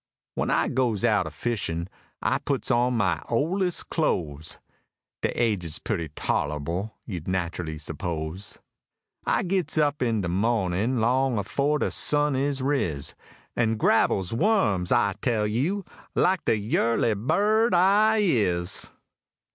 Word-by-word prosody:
When - - -1
I - - +2
goes 120 -6 0
out - - +2
a - - -4
fishin', 90 -8 -3 0.4
I - - +1
puts 140 -2 -2
on 125 0 +2
my 95 -5 +1
ol'est 175 +9 0
clo'es: 80 - -1 0.6
(Dey - - +1
age's 100 -9 0
putty 80 -2 -3
tol'able, 75 +7 -2
you'd 90 -6 -6
nat'rally 85 -3 -2
suppose!) 80 +4 -5 0.7
I - - +2
gits 180 -4 -1
up 150 -1 +1
in 115 -4 +1
de 90 - -2
moh'nin', 105 +3 0
long 125 +2 +2
afore 140 +9 0
de - - -1
sun 145 -1 +2
is 135 0 -1
riz, 90 - -1 0.4
An' 115 -2 +1
grabbles 95 -2 +2
wums, 115 - +2
I 100 -1 +3
tell 115 -4 +1
you! 150 - -1 0.3
like 185 0 +2
de 110 - +3
yurly 115 +2 +1
bird 210 - +2
I 210 +4 +4
is. 90 - +1
115 Hz, 130 wpm, -26 LUFS, 90-145 Hz, 0.7 s, I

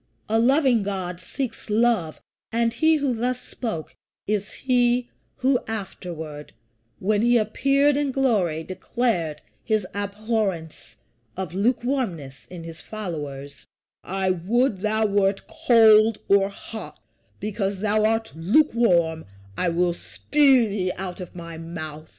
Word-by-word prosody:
A 225 +1 +2
loving 260 -1 +4
God 185 -3 -4
seeks 230 +5 -5
love; 215 -7 +1 0.3
and 230 0 +1
he 315 +6 +3
who 280 -4 0
thus 245 +2 -1
spoke 220 -14 -6 0.3
is 205 -1 -1
he 245 -1 +1 0.2
who 260 -1 +2
afterward, 170 -8 -6 0.4
when 210 +2 +1
he 240 +1 +4
appeared 275 +6 +2
in 285 -1 0
glory, 205 - +1
declared 180 -5 -2 0.2
his 215 -4 0
abhorrence 200 - -3 0.4
of 185 -4 -4
lukewarmness 210 - -1
in 175 -2 -8
his 165 -1 -9
followers: 145 -9 -7 0.4
"I 190 0 0
would 205 +5 +1
thou 220 +1 +1
wert 200 -1 +1
cold 225 -7 +5
or 195 0 +4
hot; 200 -5 -9 0.4
because 200 -1 -2
thou 215 0 +2
art 225 +1 +1
lukewarm 175 - +2 0.3
I 180 - 0
will 175 +1 +1
spue 270 +5 +3
thee 195 -3 -1
out 185 0 -6
of 180 - -9
my 170 -2 -8
mouth." 155 -2 -7
210 Hz, 125 wpm, -24 LUFS, 175-235 Hz, 0.4 s, cold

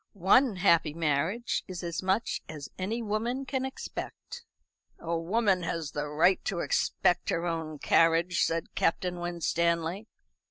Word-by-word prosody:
"One 205 +5 +4
happy 170 -5 +3
marriage 165 - 0
is 185 -2 -6
as 170 -1 -3
much 190 +4 0
as 150 -2 -8
any 220 +6 -2
woman 230 +5 -2
can 265 -1 -2
expect." 475 - -7 0.5
"A 170 0 -3
woman 190 +3 +1
has 165 -3 -3
the 145 0 -3
right 160 +6 +3
to 195 - -1
expect 180 0 +1
her 170 - 0
own 160 -2 -3
carriage," 165 +3 +3
said 165 0 -2
Captain 175 +1 0
Winstanley. 170 +2 -1
175 Hz, 135 wpm, -29 LUFS, 165-205 Hz, 0.5 s, One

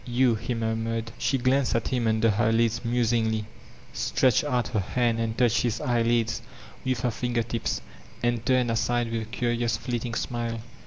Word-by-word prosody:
•Tou," 120 -1 +3
he 120 - -3
murmured. 115 0 -2
She 135 +3 +1
glanced 130 +1 +2
at 115 - 0
him 125 -3 0
under 110 0 +3
her 110 +2 +2
lids 115 0 +2
musii^y, 115 -2 +1 0.5
stretched 130 -4 +2
out 125 -6 0
her 110 - 0
hand 115 +4 0
and 115 -1 -2
touched 120 -2 +3
his 120 -1 0
eyelids 115 -1 +1 0.4
with 130 -2 -1
her 125 -1 +1
finger*ttp$, 115 0 -2 0.4
and 120 -1 +1
turned 125 -1 +2
aside 120 +1 0
with 115 0 -1
a - - -5
curious 120 0 -1
fleeting 120 -2 -3
smile. 115 -1 -2
115 Hz, 165 wpm, -26 LUFS, 115-120 Hz, 0.5 s, Tou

